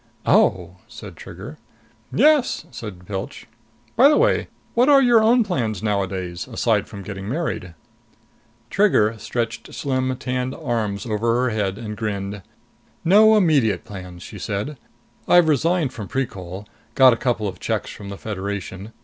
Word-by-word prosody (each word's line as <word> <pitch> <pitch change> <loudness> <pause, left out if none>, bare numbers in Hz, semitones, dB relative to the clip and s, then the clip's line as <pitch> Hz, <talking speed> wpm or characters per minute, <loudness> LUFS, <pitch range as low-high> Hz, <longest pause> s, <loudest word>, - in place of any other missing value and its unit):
"Oh," - - +2
said - - -10
Trigger. - - -10 0.5
"Yes," 300 -4 +3
said 105 -7 -8
Pilch. 95 +1 -6 0.5
"By 265 +5 +7
the 300 - +4
way, - - +2 0.3
what 245 +4 +3
are 280 -1 +7
your 240 -4 +5
own 235 +2 +4
plans 115 - -2
nowadays? 95 -4 -2
Aside 110 -3 0
from 100 -2 -9
getting 100 0 -6
married." 125 - -3 1.0
Trigger 180 - +3
stretched 120 0 -4
slim 130 -2 -1
tanned 125 +1 -3
arms 105 -4 -2
over 115 +1 0
her 125 - +1
head 100 -3 -1
and 105 -2 -6
grinned. 100 -2 -4 0.6
"No 215 +5 +6
immediate 145 - +2
plans!" 90 -3 -9
she - - -9
said. 110 +7 -4 0.5
"I've 175 -2 +6
resigned 160 -1 +1
from 105 -4 -7
Precol. 95 -7 -4 0.3
Got 130 -2 +7
a - - +1
couple 115 -3 -1
of 90 -2 -6
checks - - -2
from 100 -1 -9
the 100 - -7
Federation. 100 0 -5
115 Hz, 145 wpm, -22 LUFS, 100-150 Hz, 1.0 s, By